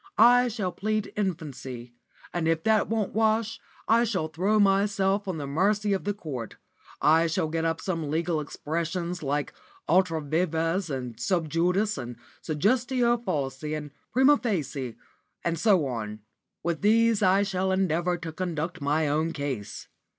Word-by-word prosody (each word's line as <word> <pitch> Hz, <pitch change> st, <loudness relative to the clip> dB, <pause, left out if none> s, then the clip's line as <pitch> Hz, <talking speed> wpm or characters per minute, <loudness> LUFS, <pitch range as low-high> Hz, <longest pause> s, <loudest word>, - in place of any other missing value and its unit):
I 245 Hz, +3 st, +7 dB
shall 205 Hz, -6 st, -2 dB
plead 215 Hz, +3 st, -2 dB
infancy, 135 Hz, -, -4 dB, 0.4 s
and 170 Hz, -2 st, 0 dB
if 165 Hz, 0 st, +1 dB
that 220 Hz, -1 st, +3 dB
won't 220 Hz, -3 st, -1 dB
wash, 220 Hz, +1 st, +1 dB, 0.3 s
I 230 Hz, +2 st, +5 dB
shall 185 Hz, -9 st, -1 dB
throw 190 Hz, +7 st, +1 dB
myself 200 Hz, 0 st, +2 dB
on 185 Hz, -3 st, -2 dB
the 145 Hz, -, -4 dB
mercy 200 Hz, +8 st, +1 dB
of 190 Hz, -, -2 dB
the 205 Hz, -, 0 dB
Court. 135 Hz, -, -6 dB, 0.4 s
I 160 Hz, +2 st, +4 dB
shall 165 Hz, 0 st, 0 dB
get 165 Hz, +1 st, -1 dB
up 165 Hz, 0 st, 0 dB
some 165 Hz, -6 st, -3 dB
legal 160 Hz, +1 st, 0 dB
expressions, 170 Hz, +4 st, -3 dB
like 145 Hz, 0 st, -2 dB, 0.3 s
ultra 170 Hz, -1 st, +3 dB
vires, 165 Hz, +3 st, 0 dB
and 125 Hz, -5 st, -5 dB
sub 160 Hz, +5 st, 0 dB
judice, 180 Hz, +4 st, +1 dB
and 120 Hz, -1 st, -6 dB, 0.3 s
suggestio 240 Hz, -, +1 dB
falsi, 150 Hz, -, -2 dB
and 150 Hz, -1 st, -7 dB, 0.2 s
prima 265 Hz, +4 st, +5 dB
facie, 140 Hz, -, -3 dB, 0.5 s
and 170 Hz, -2 st, 0 dB
so 190 Hz, -7 st, +4 dB
on. 110 Hz, -4 st, -4 dB, 0.4 s
With 170 Hz, -1 st, -1 dB
these 225 Hz, +1 st, +4 dB
I 195 Hz, 0 st, +4 dB
shall 190 Hz, -1 st, -1 dB
endeavour 180 Hz, -1 st, +1 dB
to 165 Hz, -1 st, -6 dB
conduct 170 Hz, 0 st, -3 dB
my 150 Hz, +2 st, +1 dB
own 155 Hz, +3 st, 0 dB
case. 135 Hz, -8 st, -5 dB
170 Hz, 150 wpm, -27 LUFS, 150-205 Hz, 0.5 s, I